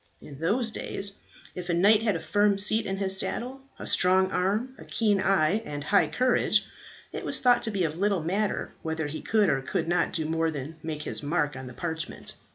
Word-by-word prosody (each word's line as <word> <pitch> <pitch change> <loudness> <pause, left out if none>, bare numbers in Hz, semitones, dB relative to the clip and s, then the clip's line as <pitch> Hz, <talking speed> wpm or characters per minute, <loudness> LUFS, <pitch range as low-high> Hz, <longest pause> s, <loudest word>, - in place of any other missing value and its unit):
In 140 -2 -12
those 220 +8 +1
days 200 -2 -3 0.4
if 180 0 -7
a 170 - +1
knight 205 +5 +5
had 215 -4 +1
a - - -2
firm 205 +1 +2
seat 215 +3 +4
in 195 0 -2
his 190 -1 +3
saddle, 255 +6 -2 0.2
a - - -8
strong 185 +1 +3
arm, 210 +8 -1
a - - -10
keen 210 -4 +1
eye, 195 +2 +2
and 145 -7 -6
high 200 +7 +3
courage, 255 0 +2 0.5
it - - -5
was - - +2
thought 245 -1 +4
to 225 - -2
be 200 -4 -1
of 160 +1 -2
little 200 -4 +1
matter 200 +5 -1
whether 160 -1 -3
he 145 +2 -5
could 215 -2 +2
or 135 -4 +1
could 135 - -2
not 175 +1 +1
do 160 - -1
more 165 0 0
than 150 +1 -6
make 155 -1 -5
his - - 0
mark 150 -1 -1
on 130 0 -8
the 125 - -10
parchment. 160 -2 -5
185 Hz, 215 wpm, -27 LUFS, 160-210 Hz, 0.5 s, knight